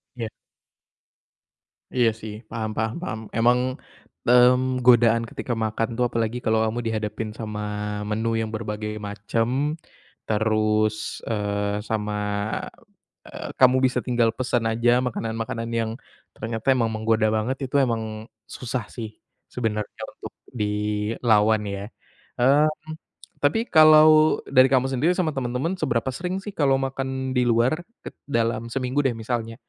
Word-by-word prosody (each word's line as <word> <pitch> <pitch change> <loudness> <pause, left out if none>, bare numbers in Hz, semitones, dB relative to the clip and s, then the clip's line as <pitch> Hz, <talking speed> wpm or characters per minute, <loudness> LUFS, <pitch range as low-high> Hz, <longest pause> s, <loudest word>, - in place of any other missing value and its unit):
Iya. 115 -2 -4 1.7
Iya 120 -2 +4
sih 105 -1 -6 0.2
paham 110 -1 -3
paham 110 +1 0
paham. 110 -11 -4 0.2
Emang, 120 +2 +4 0.7
mmm, 125 +1 +5
godaan 115 -2 +5
ketika 120 - -4
makan 110 +1 -1
tuh 125 - +2
apalagi 115 +1 -1
kalau 110 0 +3
kamu 110 +2 -2
dihadapin 110 0 -3
sama 105 -2 -5 0.5
menu 110 +2 -1
yang 110 -1 -2
berbagai 105 -1 -4 0.2
macam, 105 +3 -1 0.8
terus, 110 0 +2 0.3
eee, 105 -1 -1
sama, 105 -1 -1 1.1
eee, - - -7
kamu 130 0 +6
bisa 130 - +1
tinggal 120 -2 +2
pesan 125 -2 0
aja 120 +1 +2 0.2
makanan-makanan 115 0 -4
yang 110 -1 -1 0.4
ternyata 115 +2 -5
emang 115 -3 +1
menggoda 110 0 +1
banget, 115 +5 -1
itu 130 - -7
emang 115 -2 -1 0.4
susah 125 -2 -4
sih, 110 -2 -5 0.4
sebenarnya 105 -4 -3
untuk - - -10 0.2
dilawan 105 0 +1
ya. 100 0 -4 0.6
Mmm, 140 +5 +5 0.7
tapi 225 +12 +2
kalau 155 -1 +7
dari 130 +1 +6
kamu 130 0 +3
sendiri 135 +7 +2
sama 175 -4 +1
temen-temen 130 +6 -1
seberapa 120 -7 0
sering 180 +3 -3
sih 205 - -6
kalau 140 -3 +3
makan 130 -1 -3
di 125 - +3
luar 120 +3 +3 0.3
ket - - -9
dalam 115 -3 -1
seminggu 130 +1 -1
deh 130 - +3
misalnya? 115 0 -3
115 Hz, 130 wpm, -24 LUFS, 110-130 Hz, 1.7 s, kalau